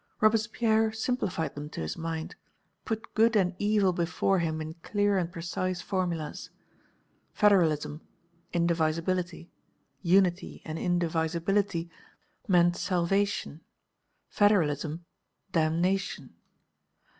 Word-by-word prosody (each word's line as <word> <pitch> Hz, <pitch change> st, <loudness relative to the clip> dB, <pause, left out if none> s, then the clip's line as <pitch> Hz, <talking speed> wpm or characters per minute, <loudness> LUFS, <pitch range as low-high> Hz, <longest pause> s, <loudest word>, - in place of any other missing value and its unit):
Robespierre 220 Hz, 0 st, +2 dB
simplified 220 Hz, -7 st, -2 dB
them 145 Hz, +1 st, -7 dB
to -, -, -7 dB
his 80 Hz, -, -3 dB
mind, 165 Hz, -1 st, -4 dB, 0.5 s
put 220 Hz, 0 st, -4 dB
good 225 Hz, +1 st, +4 dB
and 185 Hz, -3 st, +2 dB
evil 205 Hz, -3 st, +3 dB
before 175 Hz, +2 st, +1 dB
him 160 Hz, -2 st, -1 dB
in 155 Hz, 0 st, -5 dB
clear 205 Hz, +1 st, +1 dB
and 175 Hz, -2 st, 0 dB
precise 175 Hz, +1 st, -3 dB
formulas. 175 Hz, -6 st, -3 dB, 0.8 s
Federalism, 165 Hz, -7 st, +3 dB, 0.5 s
indivisibility; 170 Hz, +1 st, 0 dB, 0.5 s
unity 180 Hz, 0 st, +2 dB
and 160 Hz, 0 st, -4 dB
indivisibility 170 Hz, +1 st, 0 dB, 0.6 s
meant 175 Hz, -2 st, +4 dB
salvation, 185 Hz, -2 st, 0 dB, 0.7 s
federalism, 165 Hz, -5 st, +1 dB, 0.5 s
damnation. 175 Hz, +4 st, 0 dB
175 Hz, 90 wpm, -28 LUFS, 165-200 Hz, 0.8 s, good